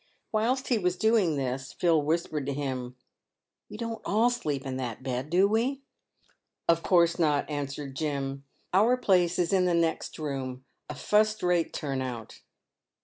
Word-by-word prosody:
"Whilst 240 +5 0
he 240 -4 +3
was 180 -1 0
doing 220 -7 +3
this, 130 -1 -3
Phil 165 -3 +3
whispered 155 -2 -1
to 140 - -2
him, 130 -3 -4 0.4
" - - -62
"We - - -8
don't 230 0 -4
all 225 +4 +3
sleep 150 - -3
in 130 -1 -3
that 125 -2 -5
bed, 130 +2 -3
do 185 +4 +4
we 250 +6 0 0.3
?" - - -38
" - - -57
Of 170 0 +4
course 170 -1 +3
not," 150 -3 +2
answered 140 -1 -4
Jim, 140 -2 -3 0.2
" - - -42
our 225 +7 +4
place 180 -7 +2
is 175 +1 +1
in 185 -1 +4
the 175 -1 +2
next 165 -1 0
room, 130 -4 -4 0.2
a 150 - -5
fust 215 +7 +2
rate 175 -2 +2
turn 135 -3 -3
out 120 -4 -6
165 Hz, 180 wpm, -28 LUFS, 135-200 Hz, 0.4 s, do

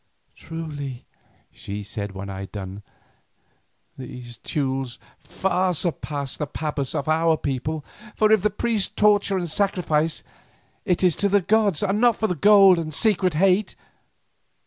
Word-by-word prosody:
"Truly," 145 -6 -7 0.5
she 100 +1 -7
said 100 -1 -5
when 100 0 -7
I 95 -1 -6
had 95 - -7
done, 100 0 -7 1.2
"these 120 -2 -9
Teules 135 -3 -2 0.2
far 185 -1 -1
surpass 145 -5 -3
the 150 - -3
pabas 145 -2 -3
of 140 - -2
our 160 +1 +3
people, 145 +3 -3 0.3
for 215 0 +3
if 220 -3 +5
the 210 - +2
priests 210 0 0
torture 205 -2 +3
and 175 -2 -2
sacrifice, 165 -4 0 0.6
it 185 -2 +1
is 180 -3 +4
to 200 - +1
the 200 0 +3
gods 210 -2 +2
and 205 +2 0
not 240 -2 +5
for 215 -3 0
gold 195 +1 +6
and 160 -1 -4
secret 185 -1 +1
hate. 190 +4 +2
165 Hz, 145 wpm, -23 LUFS, 135-195 Hz, 1.2 s, gold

